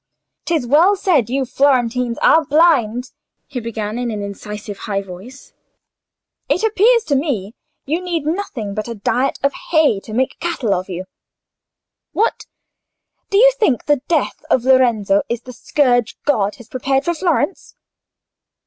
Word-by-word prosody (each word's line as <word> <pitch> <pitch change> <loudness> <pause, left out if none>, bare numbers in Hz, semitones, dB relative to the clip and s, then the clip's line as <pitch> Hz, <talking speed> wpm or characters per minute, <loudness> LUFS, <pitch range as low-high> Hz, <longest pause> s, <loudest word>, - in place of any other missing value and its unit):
"'Tis 320 -7 0
well 325 +11 +4
said 350 - +1
you 265 +1 0
Florentines 250 -2 +1
are 320 - +5
blind," 260 -6 +2 0.3
he 270 -3 -5
began, 220 -1 -4
in 245 -1 -2
an 210 -2 -4
incisive 205 0 -7
high 200 -1 0
voice. 195 +9 -12 1.0
"It 365 - +1
appears 445 +2 +3
to 290 - 0
me, 245 - -2 0.3
you 320 +6 -1
need 340 -4 -3
nothing 300 - -3
but 215 +2 -4
a 235 - -5
diet 250 +6 0
of 280 0 +2 0.2
hay 315 - +3
to 215 - -12
make 260 +2 -1
cattle 310 -11 -1
of 185 +1 -3
you. 185 0 -5 1.1
What! 445 - 0 0.8
do 395 - +2
you - - +7
think 280 - +1
the 290 -3 +2
death 320 -5 -1
of 250 - +2
Lorenzo 235 -7 +3
is 235 0 -2
the 250 - -10
scourge 245 -3 +1
God 210 -8 +1
has 240 - -15
prepared 270 +2 -1
for 345 - +1
Florence? 340 0 -1
255 Hz, 150 wpm, -18 LUFS, 220-315 Hz, 1.1 s, you